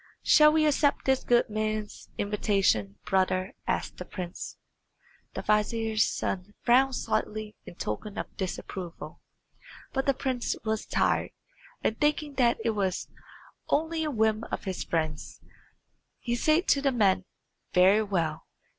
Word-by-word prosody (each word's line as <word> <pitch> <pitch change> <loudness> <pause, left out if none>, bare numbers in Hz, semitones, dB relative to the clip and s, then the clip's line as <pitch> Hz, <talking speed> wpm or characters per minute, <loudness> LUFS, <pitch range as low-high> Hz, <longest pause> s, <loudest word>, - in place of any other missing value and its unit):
"Shall 300 0 +7
we 310 0 +3
accept 290 -1 +2
this 265 -1 +2
good 240 0 +3
man's 215 0 -3
invitation, 195 - +1
brother?" 185 0 +1
asked - - -2
the - - -5
prince. 180 -2 -7 0.8
The - - -4
vizier's 215 +1 +2
son 195 +2 -3
frowned 260 +2 +4
slightly 215 -2 -2
in - - -9
token 195 - -5
of - - -5
disapproval; 185 -2 -6 0.7
but 270 0 -1
the 275 - +3
prince 255 -2 -1
was 220 -1 -2
tired, - - +1 0.5
and 220 - 0
thinking 295 0 +1
that 240 -3 +4
it 230 - +3
was 195 -4 -2 0.6
only 320 +1 +1
a 310 - -1
whim 220 -4 +1
of - - -5
his 190 -3 -3
friend's, 155 -3 -3 0.8
he 240 - -3
said 310 +8 +2
to 280 - +4
the 275 -1 +2
men, 195 -6 +2 0.5
"Very 190 +4 +5
well. 165 -7 -2
215 Hz, 135 wpm, -28 LUFS, 190-265 Hz, 0.8 s, Shall